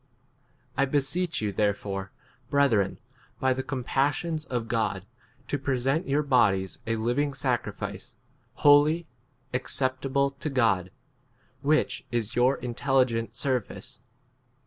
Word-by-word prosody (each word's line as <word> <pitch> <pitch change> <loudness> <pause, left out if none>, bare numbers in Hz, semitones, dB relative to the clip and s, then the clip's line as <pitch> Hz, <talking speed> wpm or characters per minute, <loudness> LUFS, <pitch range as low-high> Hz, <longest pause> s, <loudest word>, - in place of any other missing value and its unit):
I 140 - +4
beseech 145 +5 0
you 105 - 0
therefore, 100 -1 -1 0.4
breth 140 -2 +3
ren, 100 -3 +1 0.4
by 130 0 +3
the 130 - -2
compassions 145 +5 -1
of 120 -3 -3
God, 105 -5 -1 0.4
to 145 - -1
present 135 +4 0
your 145 +2 +2
bodies 100 - +2
a 115 - +1
living 125 +6 0
sacrifice, 125 -4 -3 0.4
holy, 150 +3 +5 0.5
acceptable 130 +2 0
to 140 +2 -5
God, 110 -9 +2 0.7
[which 155 +2 +1
is] 120 -3 -1
your 125 +3 +3
intelligent 120 -2 0
ser 130 +2 +1
2 105 - -12
vice. - - -11
130 Hz, 120 wpm, -27 LUFS, 115-140 Hz, 0.7 s, holy